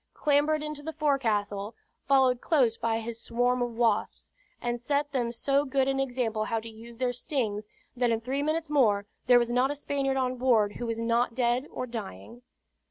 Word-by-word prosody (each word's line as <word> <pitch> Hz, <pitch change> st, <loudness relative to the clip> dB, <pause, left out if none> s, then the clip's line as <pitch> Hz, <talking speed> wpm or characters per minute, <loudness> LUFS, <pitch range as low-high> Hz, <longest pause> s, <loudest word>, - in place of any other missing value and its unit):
clambered 300 Hz, +1 st, +2 dB
into 300 Hz, -1 st, -5 dB
the 320 Hz, +2 st, -6 dB
forecastle, 220 Hz, -9 st, 0 dB, 0.3 s
followed 260 Hz, -3 st, +4 dB
close 255 Hz, -8 st, +2 dB
by 225 Hz, 0 st, -1 dB
his 230 Hz, 0 st, -5 dB
swarm 245 Hz, +1 st, +1 dB
of 245 Hz, -, 0 dB
wasps, 230 Hz, -3 st, 0 dB, 0.3 s
and 240 Hz, 0 st, -2 dB
set 285 Hz, +3 st, -1 dB
them 245 Hz, -4 st, -1 dB
so 275 Hz, +4 st, +1 dB
good 270 Hz, -1 st, +1 dB
an 270 Hz, 0 st, 0 dB
example 245 Hz, -5 st, -1 dB
how 225 Hz, +1 st, -1 dB
to 225 Hz, +1 st, -9 dB
use 230 Hz, +1 st, -12 dB
their 250 Hz, 0 st, 0 dB
stings, 230 Hz, -6 st, -2 dB, 0.3 s
that 245 Hz, -1 st, +1 dB
in 225 Hz, -1 st, +1 dB
three 260 Hz, +5 st, -2 dB
minutes 315 Hz, +2 st, -1 dB
more 210 Hz, -8 st, +3 dB, 0.2 s
there 245 Hz, -, +7 dB
was 240 Hz, 0 st, +1 dB
not 250 Hz, +2 st, +2 dB
a 290 Hz, -, -2 dB
Spaniard 275 Hz, -1 st, -1 dB
on 255 Hz, -1 st, 0 dB
board 230 Hz, -5 st, +2 dB
who 240 Hz, -, -4 dB
was 230 Hz, -1 st, -2 dB
not 230 Hz, +1 st, +1 dB
dead 245 Hz, +2 st, +1 dB
or 255 Hz, -, -4 dB
dying. 230 Hz, -, -8 dB
245 Hz, 190 wpm, -28 LUFS, 230-275 Hz, 0.3 s, there